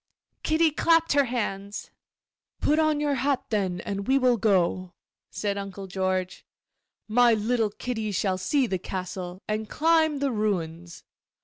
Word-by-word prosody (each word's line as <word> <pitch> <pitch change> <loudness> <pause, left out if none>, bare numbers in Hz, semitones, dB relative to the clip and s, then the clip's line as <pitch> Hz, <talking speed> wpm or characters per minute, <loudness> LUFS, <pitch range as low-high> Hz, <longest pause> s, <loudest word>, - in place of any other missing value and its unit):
Kitty 315 0 +3
clapped 330 +1 +3
her 285 -1 +4
hands. 205 -4 -4 0.7
'Put 305 +2 +2
on 310 -1 +2
your 295 -1 +1
hat, 275 0 0
then, 190 -4 0
and 200 +1 -4
we 265 +1 +4
will 255 -2 +4
go,' 185 -4 +1 0.3
said 200 -1 -2
Uncle 195 0 -7
George. 185 -1 -2 0.6
'My 235 +1 +5
little 220 +1 +1
Kitty 220 0 -4
shall 190 -1 0
see 265 +9 +1
the 190 -5 -2
castle, 185 0 -6
and 215 0 -2
climb 315 -1 +3
the 280 -1 0
ruins. 175 -6 -3
215 Hz, 140 wpm, -26 LUFS, 190-275 Hz, 0.7 s, My